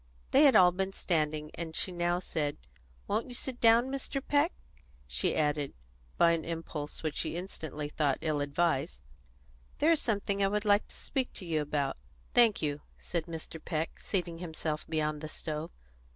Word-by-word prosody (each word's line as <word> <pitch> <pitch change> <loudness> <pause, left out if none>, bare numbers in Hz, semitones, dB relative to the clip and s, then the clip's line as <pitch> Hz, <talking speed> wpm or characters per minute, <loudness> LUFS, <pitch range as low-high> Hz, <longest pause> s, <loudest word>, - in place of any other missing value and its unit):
They 285 +3 +7
had 275 - +7
all 180 -1 +8
been 190 +2 -2
standing, 155 -4 -1
and 165 -1 -5
she 185 - 0
now 175 0 +1
said, 155 -5 -2 0.5
"Won't 225 - 0
you 245 - -5
sit 250 0 -5
down, 235 +3 +6
Mr. 275 0 -2
Peck?" 290 +4 +2 0.5
She - - 0
added, 150 -2 +1 0.4
by 170 - +6
an 165 -1 0
impulse 165 -3 -5
which 155 -2 -1
she 160 -1 -1
instantly 160 -5 -5
thought 145 -2 +1
ill 155 -2 0
advised, 145 +1 0 0.7
"There 315 +3 +4
is 325 - +3
something 200 -2 0
I - - +5
would 210 +2 -1
like 205 0 +4
to - - -14
speak 265 -2 -2
to 190 - -7
you 160 -3 0
about." 145 -2 -1 0.4
"Thank 230 -7 +5
you," 145 -1 -1 0.2
said 170 -1 -3
Mr. 160 -1 -6
Peck, 160 -1 -2
seating 175 -4 -2
himself 160 -3 -3
beyond 155 -2 -1
the 155 - -5
stove. 155 +1 -4
165 Hz, 175 wpm, -31 LUFS, 155-200 Hz, 0.7 s, all